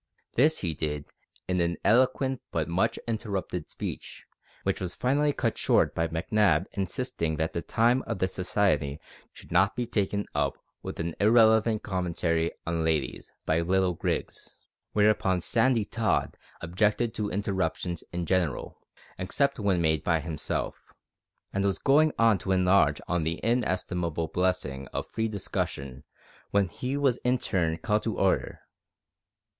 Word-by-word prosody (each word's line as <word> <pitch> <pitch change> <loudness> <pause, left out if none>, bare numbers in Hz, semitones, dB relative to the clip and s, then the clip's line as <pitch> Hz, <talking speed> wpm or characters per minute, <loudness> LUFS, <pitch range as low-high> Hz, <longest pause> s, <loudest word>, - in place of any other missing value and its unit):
This 150 +6 +4
he 85 -4 -1
did 75 -1 -3 0.4
in 90 -1 +1
an 85 0 0
eloquent 130 +2 +3
but 80 -1 -1
much 85 +2 +1
interrupted 100 -7 -3
speech, - - -7 0.4
which - - -1
was 90 -1 -4
finally 145 +4 +2
cut 120 -5 -1
short - - +3
by 80 - 0
Macnab 85 +1 +2
insisting 95 -4 -2
that 80 +1 -2
the 85 - -2
time 120 +6 +2
of 115 - -2
the 95 - +1
Society 90 -6 0 0.3
should - - -16
not 90 +3 +3
be 120 0 -1
taken 100 -2 -1
up - - 0 0.2
with - - -7
an 80 0 -2
irrelevant 110 0 +4
commentary 85 -3 0 0.2
on 85 -1 -1
ladies 80 -3 -1
by 80 +1 +2
little 95 +1 +2
Grigs; 80 - -4 0.4
whereupon 105 -3 +3
Sandy 115 +3 +2
Tod 115 0 0 0.3
objected 105 +7 +1
to 105 -1 -2
interruptions 95 -3 -2
in 85 0 -3
general 90 -5 -1 0.4
except 135 +9 0
when 100 -4 +1
made 80 -1 +2
by 85 -2 +2
himself 80 -1 -4 0.6
and 100 - 0
was 100 -1 +1
going 150 +3 +4
on 115 -4 +4
to 95 - -3
enlarge 90 -5 +4
on 90 0 0
the 80 +2 -2
inestimable 90 -8 0
blessing 90 -8 -1
of - - -4
free 110 0 -2
discussion 70 - -4 0.5
when 100 -1 +2
he 130 +10 -3
was 135 -4 +2
in 125 +1 +1
turn 85 -8 0
called 105 +5 0
to 110 -1 -3
order. 95 -1 +1
95 Hz, 145 wpm, -28 LUFS, 85-110 Hz, 0.6 s, This